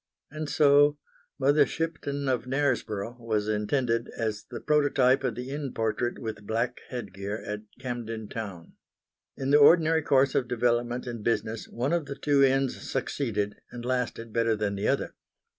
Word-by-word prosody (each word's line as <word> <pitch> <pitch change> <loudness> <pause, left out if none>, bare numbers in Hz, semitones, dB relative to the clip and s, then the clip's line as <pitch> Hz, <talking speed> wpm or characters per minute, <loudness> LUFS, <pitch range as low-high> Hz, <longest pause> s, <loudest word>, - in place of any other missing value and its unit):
And 155 0 -5
so 145 0 +5 0.4
Mother 145 +2 +4
Shipton 145 -2 -3
of 130 -2 0
Knaresborough 125 -5 -1
was 110 -3 -1
intended 115 +2 0
as 110 -2 -2
the - - -6
prototype 140 -3 +3
of 125 -4 -1
the 125 +2 -6
inn 140 -2 -4
portrait 115 +2 -1
with 110 -3 -6
black 115 +3 -1
headgear 100 -4 -5
at 105 0 -3 0.2
Camden 115 -4 -5
Town. 100 -8 -7 0.6
In 135 +1 -1
the 145 - +7
ordinary 160 +1 +6
course 135 -2 +3
of 125 - +1
development 120 0 0
and 120 -3 -6
business 115 -1 -1
one 130 +6 -1
of 170 -4 0
the 140 - -5
two 140 -1 +3
inns 135 0 +2
succeeded 110 -6 -2
and 120 -1 -8
lasted 125 -3 -2
better 115 -1 +2
than 105 -1 -1
the 100 +1 -2
other. - - 0
125 Hz, 160 wpm, -28 LUFS, 110-140 Hz, 0.6 s, the